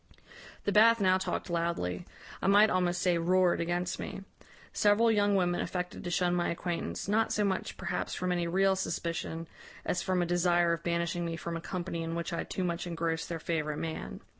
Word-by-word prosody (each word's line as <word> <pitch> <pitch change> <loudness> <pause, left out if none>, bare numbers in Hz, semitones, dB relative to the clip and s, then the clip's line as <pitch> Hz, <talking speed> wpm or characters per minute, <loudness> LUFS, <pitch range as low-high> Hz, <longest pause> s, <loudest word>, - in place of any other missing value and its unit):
"The 205 - 0
Bath 230 +3 +6
now 185 -1 +4
talked 185 - -3
loudly 165 - -2 0.3
I - - 0
might 205 +2 +6
almost 175 -1 +1
say, 175 -2 +3
roared 180 +1 +3
against 175 +1 -1
me. 195 - -6 0.5
Several 215 +2 +4
young 205 -1 +3
women 175 -2 +1
affected 180 +1 -4
to 175 - -3
shun 175 0 +1
my 175 -1 +1
acquaintance, 170 - -3
not 220 +2 +2
so 210 - +1
much, 190 -1 -2
perhaps, 180 -1 -3
from 180 0 -1
any 175 -1 0
real 190 +2 +3
suspicion, 165 -3 -3 0.4
as 180 - 0
from 185 -2 +1
a - - 0
desire 175 0 +3
of 165 - -3
banishing 170 0 -1
me 165 -1 -2
from 170 +1 -5
a 165 - -4
company 175 -2 -4
in 165 0 -3
which 170 0 -3
I 170 - -1
too 185 - -4
much 175 0 -2
engrossed 165 -1 -2
their 170 - -2
favourite 155 -2 -2
man. 160 0 -5
175 Hz, 195 wpm, -30 LUFS, 170-185 Hz, 0.5 s, Bath